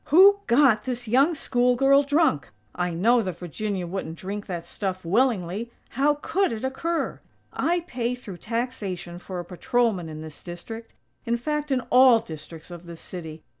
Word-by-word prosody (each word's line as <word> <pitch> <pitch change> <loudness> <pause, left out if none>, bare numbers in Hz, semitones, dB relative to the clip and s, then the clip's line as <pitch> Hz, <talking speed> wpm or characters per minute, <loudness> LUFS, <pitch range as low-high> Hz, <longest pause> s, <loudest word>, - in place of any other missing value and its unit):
Who 390 +6 +7
got 235 -3 +4
this 245 -2 -3
young 275 +9 +4
school 250 -3 +2
girl 275 +2 +5
drunk? 290 - +2 0.2
I 180 0 -1
know 230 +7 +4
that 185 -5 -4
Virginia 185 +2 -3
wouldn't 170 -2 -5
drink 200 +3 -5
that 175 -3 -4
stuff 185 0 -4
willingly. 210 0 +1 0.2
How 285 +4 +2
could 390 +3 +1
it 225 +2 -3
occur? 330 +6 -2 0.3
I 350 +1 +1
pay 250 -7 -2
through 205 -7 -9
taxation 205 -6 -4
for 180 0 -6
a 175 - -5
patrolman 190 0 0
in 155 0 -7
this 155 -2 -9
district; 225 +6 -8 0.3
in 235 +1 0
fact 300 +4 -2
in 265 -2 +1
all 255 -1 +8
districts 160 -4 -9
of 175 0 -10
this 170 -1 -9
city. 160 -3 -8
225 Hz, 170 wpm, -25 LUFS, 175-260 Hz, 0.3 s, all